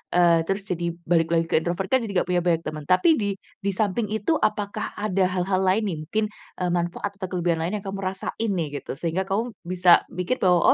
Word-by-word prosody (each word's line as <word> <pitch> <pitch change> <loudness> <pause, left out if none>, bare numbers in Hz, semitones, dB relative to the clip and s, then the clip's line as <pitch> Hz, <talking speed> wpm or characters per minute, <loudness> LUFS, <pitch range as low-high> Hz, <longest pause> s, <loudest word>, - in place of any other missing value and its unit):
eee, 170 -2 +5
terus 195 +1 -1
jadi 170 -3 -2
balik 165 0 +2
lagi 165 0 +2
ke - - +3
introvert 175 +3 -2
kan 260 - +5
jadi 210 -3 -4
nggak - - -18
punya 180 - +3
banyak 165 -2 +2
temen 155 -1 -5
tapi 185 - +4
di 200 -2 -1 0.2
di 200 -1 -1
samping 210 +2 0
itu 220 +9 0
apakah 210 -1 -1
ada 195 -3 +1
hal-hal 185 +1 0
lain 190 +4 +3
nih 175 -5 -2
mungkin, 215 +5 0 0.3
eee, 180 -1 0
manfaat 175 +3 -1
atau 190 - -3
kelebihan 175 -2 0
lain 175 +6 -1
yang - - -19
kamu 195 0 -4
rasain 195 +3 -2
nih 150 -5 -2
gitu, - - -7
sehingga 170 +5 -1
kamu 220 +5 -1 0.2
bisa 180 -1 +5
mikir 180 +8 -2
bahwa 180 -2 +4
185 Hz, 220 wpm, -24 LUFS, 175-200 Hz, 0.3 s, eee